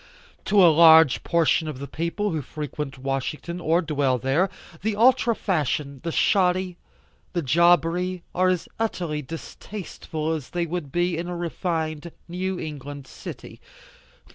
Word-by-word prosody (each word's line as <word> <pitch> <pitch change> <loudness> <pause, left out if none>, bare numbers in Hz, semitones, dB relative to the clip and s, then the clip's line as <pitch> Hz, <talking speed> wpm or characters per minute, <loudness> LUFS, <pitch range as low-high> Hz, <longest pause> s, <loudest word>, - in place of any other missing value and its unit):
To 205 - +3
a 165 - +7
large 160 -3 +7
portion 165 -1 +2
of 150 -4 -5
the 140 - -6
people 170 +8 -2
who 160 -2 -2
frequent 150 0 -6
Washington 135 +6 -3
or 170 +2 +2
dwell 145 -5 +1
there, 135 - +1 0.3
the 215 0 -1
ultra 240 +1 +4
fashion, 150 - -1
the 165 - -2
shoddy, 185 -1 +2 0.6
the 175 -2 -1
jobbery 170 +4 +2
are 185 +1 +2
as 180 -2 -1
utterly 175 -9 -2
distasteful 160 +1 -6
as 150 -4 -5
they 175 -1 -1
would 165 -4 -4
be 175 +1 +1
in 170 - -4
a 175 -1 -4
refined 165 -2 -3 0.2
New 185 +1 -3
England 145 -2 -7
City. - - -10
165 Hz, 140 wpm, -24 LUFS, 150-180 Hz, 0.6 s, a